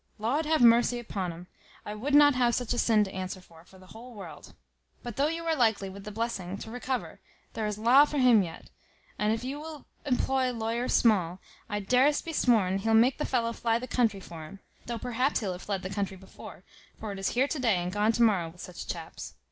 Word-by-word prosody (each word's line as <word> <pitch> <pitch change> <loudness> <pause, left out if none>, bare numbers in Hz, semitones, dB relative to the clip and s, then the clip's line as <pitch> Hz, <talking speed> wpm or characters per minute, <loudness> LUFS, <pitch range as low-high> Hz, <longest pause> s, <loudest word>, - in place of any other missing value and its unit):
Laud 270 +9 -1
have 315 -5 +3
mercy 240 +1 +5
upon 195 -6 -4
'um; 170 +2 -10 0.4
I 210 - -5
would 270 +7 -1
not 290 0 +7
have 245 -2 +2
such 245 -1 -1
a 240 - -1
sin 220 -2 +4
to 190 - -6
answer 185 0 -5
for, 165 -3 -18
for 190 - -19
the 185 - -16
whole 235 +2 -12
world. 200 - -11 0.5
But 240 -3 -6
though 280 +2 +2
you 330 +1 -4
are 325 -1 +1
likely, 220 -7 +1
with 195 +1 -11
the 210 - -6
blessing, 200 -4 -3
to 220 - -9
recover, 250 +1 -4 0.3
there 220 -1 -2
is 210 -1 -3
laa 245 +6 +6
for 295 - -4
him 250 -5 +6
yet; 165 -3 -7 0.5
and 210 0 +2
if 225 +1 -2
you 270 +3 -4
will 310 -1 -9 0.2
employ 260 -1 0
lawyer 230 +2 -2
Small, 185 -7 +2 0.3
I 205 0 -2
darest 255 - +2
be 330 - -5
sworn 205 -9 +2
he'll 225 +3 +1
make 245 +5 +4
the 300 - -1
fellow 235 -2 0
fly 230 0 0
the 245 - -5
country 230 -5 +1
for 165 -4 -9
him; 195 +4 -12 0.3
though 235 0 -3
perhaps 250 +4 0
he'll 200 -4 -2
have 180 0 -7
fled 195 -2 -3
the 185 - -4
country 195 -1 -3
before; 190 +1 -13 0.4
for 215 - -5
it 195 - -6
is 195 - 0
here 265 +3 +4
to 295 - -3
day 230 -6 +2
and 175 0 -2
gone 210 +2 +2
to 235 - +2
morrow 190 -7 +2
with 175 +2 -14
such 180 - -8
chaps. 165 -2 -7
225 Hz, 235 wpm, -28 LUFS, 195-250 Hz, 0.5 s, not